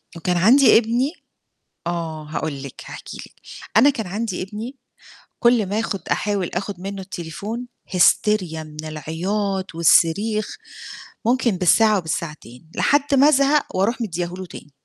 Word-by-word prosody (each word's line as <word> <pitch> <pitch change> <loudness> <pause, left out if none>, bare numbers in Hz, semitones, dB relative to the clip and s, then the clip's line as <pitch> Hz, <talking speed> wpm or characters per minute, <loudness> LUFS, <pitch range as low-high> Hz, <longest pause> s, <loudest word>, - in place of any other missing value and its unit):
وكان 175 +2 -1
عندي 250 +10 +6
ابني 240 +5 +1 0.8
آه، 165 -3 -3
هاقول 150 -2 -4
لِك، 140 - -9
هاحكي - - -9
لِك، - - -11 0.4
أنا 270 +6 +7
كان 220 -7 -3
عندي 205 0 -3
ابني 215 +7 -7 0.6
كل 235 -3 +3
ما 205 +3 -1
آخُد 205 -3 -3
أحاول 200 -4 -1
آخُد 195 -2 -4
منُّه 195 +1 -5
التليفون 195 +7 -6 0.2
هِيستيريا 180 -2 +2
من 155 0 -9
العياط 185 +5 -3
والصريخ 200 +6 +3 0.8
ممكن 245 0 +2
بالساعة 210 +4 +4
وبالساعتين، 155 -5 -6
لحد 285 0 +2
ما 275 +2 +6
أزهق 280 -4 +2
وأروح 210 +7 +1
مدّياه 175 -6 -2
له 185 0 -7
تاني. 150 - -12
195 Hz, 135 wpm, -21 LUFS, 165-225 Hz, 0.8 s, أنا